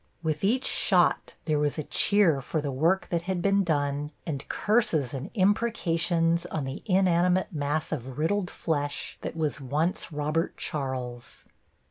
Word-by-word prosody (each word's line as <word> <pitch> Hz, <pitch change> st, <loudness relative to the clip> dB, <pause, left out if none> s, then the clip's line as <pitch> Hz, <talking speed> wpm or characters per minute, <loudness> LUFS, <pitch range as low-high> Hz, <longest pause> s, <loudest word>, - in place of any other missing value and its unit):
With 155 Hz, 0 st, -1 dB
each 245 Hz, +7 st, +2 dB
shot -, -, +2 dB
there 155 Hz, -2 st, +1 dB
was 145 Hz, +1 st, 0 dB
a 155 Hz, -, -2 dB
cheer 175 Hz, -5 st, +3 dB
for 155 Hz, +5 st, -2 dB
the 145 Hz, -2 st, -2 dB
work 165 Hz, +8 st, +1 dB
that 170 Hz, -1 st, 0 dB
had 185 Hz, -2 st, 0 dB
been 200 Hz, +2 st, +3 dB
done 145 Hz, -3 st, 0 dB, 0.2 s
and 145 Hz, -5 st, -4 dB
curses 170 Hz, -, +1 dB
and 135 Hz, +6 st, -5 dB
imprecations 175 Hz, -5 st, +1 dB
on 155 Hz, -4 st, -3 dB
the 135 Hz, +1 st, -5 dB
inanimate 185 Hz, 0 st, +3 dB
mass 150 Hz, +1 st, -1 dB
of 130 Hz, -4 st, -5 dB
riddled 180 Hz, +4 st, 0 dB
flesh 145 Hz, -3 st, -3 dB
that -, -, -5 dB
was 150 Hz, -2 st, -1 dB
once 150 Hz, +9 st, -1 dB
Robert 150 Hz, +3 st, -1 dB
Charles. 130 Hz, -5 st, -5 dB
160 Hz, 150 wpm, -27 LUFS, 145-185 Hz, 0.2 s, cheer